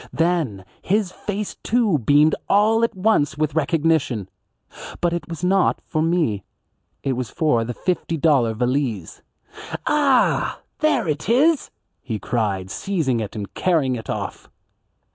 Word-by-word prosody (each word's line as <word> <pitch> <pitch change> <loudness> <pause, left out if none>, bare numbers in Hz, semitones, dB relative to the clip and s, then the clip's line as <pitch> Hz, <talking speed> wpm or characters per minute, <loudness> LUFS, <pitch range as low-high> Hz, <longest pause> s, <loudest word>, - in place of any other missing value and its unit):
Then 160 - 0 0.2
his 200 -1 0
face, 205 +2 -5
too, 220 -9 +2
beamed 145 +5 +4 0.2
all 220 +3 +4
at 230 - 0
once 185 -8 +1
with 155 -1 0
recognition. 155 - +1 0.7
But 175 -1 +1
it 170 -3 -4
was 165 0 -7
not 190 +1 +2
for 155 - -1
me. 160 - +1 0.6
It 135 - 0
was 125 -3 -3
for 135 -6 +1
the 120 +1 -5
fifty 175 -2 -2
dollar 135 -8 +3
valise. 125 - -2 0.6
"Ah, 280 -4 +2 0.2
there 305 - +2
it 150 +5 -2
is," 290 +6 +3 0.3
he 115 -5 -4
cried, 100 -5 -2
seizing 155 - -1
it 110 -1 -5
and 105 -2 -6
carrying 155 -8 +1
it 110 - -8
off. - - -5
155 Hz, 140 wpm, -22 LUFS, 120-190 Hz, 0.7 s, beamed